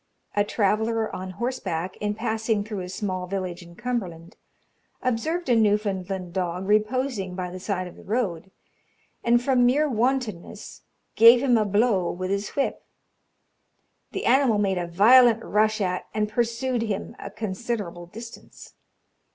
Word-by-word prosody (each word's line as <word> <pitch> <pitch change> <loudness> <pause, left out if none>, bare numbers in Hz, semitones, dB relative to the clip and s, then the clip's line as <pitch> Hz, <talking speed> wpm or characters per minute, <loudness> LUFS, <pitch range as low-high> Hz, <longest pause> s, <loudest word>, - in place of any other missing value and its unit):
A 205 - +3
traveller 220 +2 0
on 185 0 -6
horseback, 185 -8 -3
in 210 0 -2
passing 220 -1 -1
through 210 -1 -5
a 180 -1 -6
small 185 -1 -3
village 185 -2 -4
in 170 0 -14
Cumberland, 190 -7 -4 0.7
observed 295 +8 -1
a 245 - +4
Newfoundland 195 -4 0
dog 180 0 -2
reposing 215 -2 0
by 180 -1 -4
the 185 - -7
side 185 -1 -2
of 175 - -12
the - - -14
road, 195 -6 -2 0.7
and 240 +1 +3
from 255 -2 +3
mere 280 +5 +3
wantonness 245 -6 -2 0.3
gave 235 +3 +8
him 255 -3 +4
a 215 -2 +3
blow 205 -3 +2
with 185 +1 -4
his 200 +1 -1
whip. 280 - -1 1.3
The - - -4
animal 255 -3 +4
made 195 -3 +1
a 175 - -3
violent 230 +6 +6
rush 215 +1 +1
at 185 -2 -2
and 210 -1 +1
pursued 235 +3 -1
him 215 -4 -3
a 200 - -7
considerable 200 -4 -4
distance. 230 +5 -11
210 Hz, 145 wpm, -25 LUFS, 185-235 Hz, 1.3 s, gave